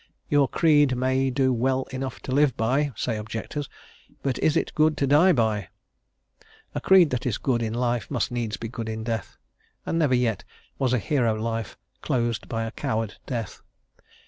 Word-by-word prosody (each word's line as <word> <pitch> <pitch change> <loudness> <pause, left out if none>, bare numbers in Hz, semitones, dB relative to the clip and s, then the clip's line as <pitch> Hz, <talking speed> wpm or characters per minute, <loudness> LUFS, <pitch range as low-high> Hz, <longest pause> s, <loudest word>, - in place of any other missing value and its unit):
"Your 145 -2 +4
creed 145 -5 +3
may 130 +1 +1
do 130 0 +2
well 130 +2 +1
enough 130 0 -5
to - - -6
live 140 -1 +3
by," 135 +6 +1
say 110 +1 -2
objectors, 110 +7 -5 0.5
"but 135 -2 -1
is 155 +1 +2
it - - -1
good 155 0 +3
to 140 - +1
die 150 +7 +5
by?" 110 - +1 1.1
A - - -3
creed 185 -5 +6
that 125 0 -1
is 110 - 0
good 120 -3 0
in 115 0 -2
life 120 -1 -1
must 125 -5 -1
needs 115 -3 -2
be 115 - -5
good 115 -1 -5
in 110 0 -4
death, 115 -2 -4 0.5
and 165 - -1
never 145 -5 +3
yet 115 -5 0 0.4
was 130 -3 +1
a - - +4
hero 120 -1 +1
life 115 -1 -3 0.2
closed 120 -2 -1
by 115 -1 -2
a 115 - -4
coward 110 -2 -3
death. 115 -5 -4
125 Hz, 180 wpm, -25 LUFS, 115-140 Hz, 1.1 s, creed